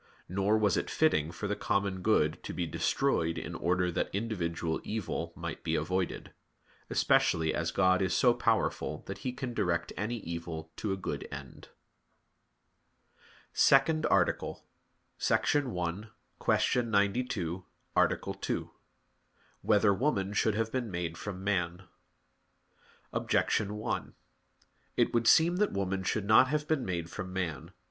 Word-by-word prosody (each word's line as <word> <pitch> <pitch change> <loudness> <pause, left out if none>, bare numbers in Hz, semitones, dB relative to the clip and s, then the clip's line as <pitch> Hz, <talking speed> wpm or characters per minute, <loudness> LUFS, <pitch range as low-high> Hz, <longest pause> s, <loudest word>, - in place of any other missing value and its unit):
Nor 100 +4 +2
was 105 -4 +2
it - - -2
fitting 75 +1 +2
for 95 +5 -4
the 105 - -1
common 100 -2 -1
good 85 -6 +2
to - - -6
be 90 - -2
destroyed 80 0 0
in - - -5
order 90 0 +1
that 85 - -1
individual 85 -6 -2
evil 95 -6 -3
might - - -6
be - - 0
avoided; 90 +3 -2 0.6
especially 80 -1 +3
as 85 -1 -1
God 95 +2 +3
is 95 -1 +1
so 125 -2 +5
powerful 115 -2 0
that - - -6
He 130 - -3
can 125 -1 -5
direct 85 -6 -1
any 110 +4 -2
evil 85 -1 -6
to 105 - -2
a 95 - -1
good 95 - -4
end. - - -9 1.4
_______________________ - - -40 0.4
SECOND 155 +3 +4
ARTICLE - - +1 0.7
[I, - - +6
Q. 105 -1 -1
92, 100 -5 0 0.3
Art. - - +1
2] - - -2 0.9
Whether 105 -1 +4
Woman 100 -5 0
Should 105 +1 +2
Have 110 0 -1
Been 125 -3 -2
Made 85 -3 -3
from 95 0 -6
Man? 90 -2 -1 1.3
Objection 105 0 +1
1: 105 - -3 0.8
It - - +2
would 115 -1 +2
seem 170 +2 +6
that 210 +1 +2
woman 95 -1 -1
should 100 +2 -1
not 110 +5 +6
have 150 +2 -1
been 155 -5 +1
made 85 -3 -3
from 95 -3 -5
man. 85 -7 -3
100 Hz, 140 wpm, -31 LUFS, 85-110 Hz, 1.4 s, I